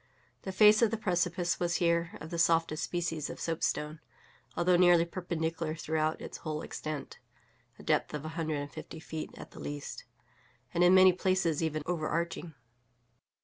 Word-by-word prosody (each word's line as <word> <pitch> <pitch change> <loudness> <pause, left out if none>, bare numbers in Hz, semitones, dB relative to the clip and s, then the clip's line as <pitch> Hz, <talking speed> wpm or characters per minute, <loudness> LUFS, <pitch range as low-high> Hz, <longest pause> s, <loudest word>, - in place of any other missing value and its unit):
The 190 - -5
face 210 +3 +6
of 230 - +5
the 225 - -2
precipice 175 -3 0
was 175 0 0
here 170 -1 +1
of 160 - -9
the 170 - -3
softest 165 -2 +2
species 165 -4 -2
of - - -7
soapstone, 155 -1 -2 0.6
although 175 +1 +4
nearly 175 -1 +6
perpendicular 165 -2 -3
throughout 155 0 -1
its - - -7
whole 155 -1 -4
extent 155 -2 -6 0.6
(a - - -13
depth - - +1
of 150 0 -5
a - - -3
hundred 160 -1 -2
and 145 - -7
fifty 160 - -9
feet 160 0 -6
at - - -10
the - - -12
least), 145 0 -6 0.7
and 175 - +3
in 180 +1 +7
many 185 0 +8
places 180 -4 +1
even 155 -2 -1
overarching. 165 -1 -2
165 Hz, 165 wpm, -31 LUFS, 155-175 Hz, 0.7 s, many